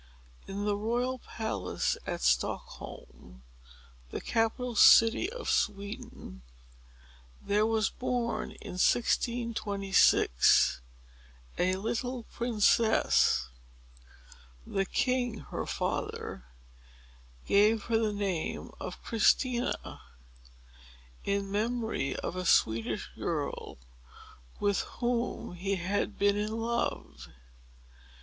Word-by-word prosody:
In 200 +1 -4
the 205 -1 +1
royal 240 +5 -1
palace 220 - -2
at - - -3
Stockholm, - - -3 0.7
the - - -4
capital 235 +2 -1
city 225 - +6
of - - -7
Sweden, 200 - -3 1.0
there 210 +2 +1
was 220 -1 +1
born, 245 -2 -2
in 180 - -8
1626, 205 - +3 0.8
a 185 +1 +2
little 235 +5 -3
princess. 220 - +2 1.2
The 195 -1 -1
king, 245 -2 0
her - - -3
father, 60 - -3 1.0
gave 210 +1 +4
her 225 -1 +1
the 220 -2 +1
name 195 -5 -3
of - - -7
Christina, 240 +2 +1 1.2
in 200 0 -1
memory 220 - -1
of - - -4
a 185 0 -3
Swedish 110 -6 +2
girl - - -4 0.8
with 200 -1 +1 0.2
whom 240 -3 -2
he 195 +3 -2
had 195 +3 -2
been 200 0 +3
in 210 +2 -2
love. 230 - -3
215 Hz, 90 wpm, -30 LUFS, 195-235 Hz, 1.2 s, city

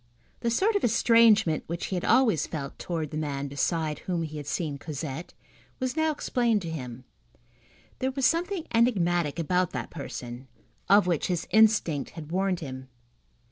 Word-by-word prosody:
The 235 - 0
sort 395 - +2
of 405 - +1
estrangement 225 -6 +4
which 170 +1 -3
he 190 - -3
had 180 - -2
always 230 - +3
felt 140 -4 -6
towards 160 -4 -3
the 155 - -4
man 140 -2 -3
beside 150 +2 -1
whom 175 -3 -2
he 155 -1 -6
had 145 -1 -7
seen 150 -5 -2
Cosette, 150 +1 -6 0.4
was 255 0 -2
now 315 0 +2
explained 235 -7 0
to 165 - -4
him. 125 -5 -6 1.0
There 260 - 0
was 265 0 -1
something 345 +4 +1
enigmatic 175 - +2
about 180 +2 0
that - - -4
person, 130 -4 -7 0.4
of 200 0 +6
which 175 -4 0
his 175 -2 -2
instinct 210 -10 +3
had 155 -1 -8
warned 185 -1 0
him. 130 -3 -7
175 Hz, 165 wpm, -27 LUFS, 150-230 Hz, 1.0 s, of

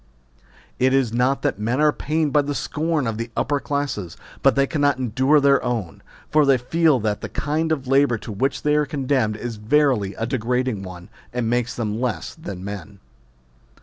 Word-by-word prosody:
It 130 +1 +3
is 130 -5 +1
not 125 +3 +1
that - - 0
men 115 +5 -1
are 150 0 +5
pained 155 -1 -1
by 150 - +5
the 145 0 -3
scorn 155 -1 -1
of 115 -1 -3
the 115 0 -4
upper 145 0 +1
classes, 140 - -3 0.2
but - - +4
they 140 0 +3
cannot 145 -2 +1
endure 130 +4 +3
their 140 -1 +4
own; 115 -8 -3 0.3
for 155 0 +5
they 135 -2 +4
feel 155 +3 +2
that 105 -1 -1
the - - -5
kind 155 +2 -1
of 140 -4 -1
labour 135 -2 +3
to 110 - -8
which 130 +7 -1
they 150 - +2
are 150 -1 +2
condemned 130 -7 0
is 115 -1 -5
verily 110 -3 +2
a 115 - -2
degrading 125 -2 -1
one, 90 -1 -9 0.2
and 120 -2 -2
makes 120 -2 0
them 110 -1 -3
less 125 -3 -2
than 100 - -8
men. 100 0 -7
130 Hz, 190 wpm, -22 LUFS, 110-145 Hz, 0.3 s, are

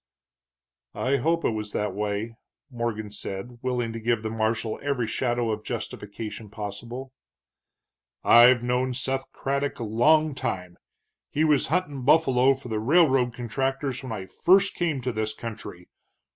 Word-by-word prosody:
"I 135 +2 +1
hope 165 +5 +1
it - - +3
was 105 -1 -4
that 105 -2 -1
way," 105 +2 -2 0.4
Morgan 115 -3 -3
said, 105 +4 -6
willing 125 -3 -1
to 115 - -5
give 115 0 0
the 110 - -3
marshal 110 0 -1
every 140 -4 0
shadow 120 0 0
of 105 0 -3
justification 110 -1 -6
possible. 115 +5 -7 1.1
"I've 120 +1 +7
known 125 +1 0
Seth 135 +1 -2
Craddock 140 +1 -2
a - - -4
long 150 +8 +3
time; 95 -10 -4 0.5
he 155 - 0
was 150 -3 +3
huntin' 150 -4 -1
buffalo 135 -2 +4
for 130 -1 -11
the 110 -1 -1
railroad 130 -2 +3
contractors 135 +2 -2
when 130 -3 -7
I 100 -4 -4
first 190 - +3
came 160 -6 -1
to 125 +1 -1
this 110 -1 -2
country. 105 -6 -8
120 Hz, 145 wpm, -26 LUFS, 110-135 Hz, 1.1 s, I've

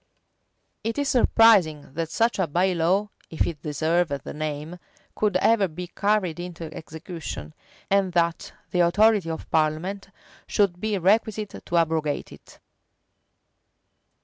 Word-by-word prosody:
It 225 +4 -2
is 285 -1 0
surprising 200 - +4
that 165 +1 -3
such 230 +5 +1
a 185 - +2
by 180 +5 +1
law 185 +5 +1 0.2
(if 160 - 0
it 160 -4 -5
deserve 160 +3 +1
the 140 -2 -5
name) 155 +3 -5 0.4
could 205 -3 +1
ever 210 +1 +3
be 180 +2 -7
carried 200 -5 +1
into 170 -3 -7
execution, 160 - -8 0.3
and 195 -1 +2
that 170 -1 0 0.2
the 180 - 0
authority 195 +1 +4
of 160 - -5
parliament 160 +6 0 0.4
should 195 -4 +1
be 215 -2 0
requisite 210 +2 0
to 175 - 0
abrogate 160 -3 0
it. - - -15
175 Hz, 130 wpm, -25 LUFS, 160-200 Hz, 0.4 s, surprising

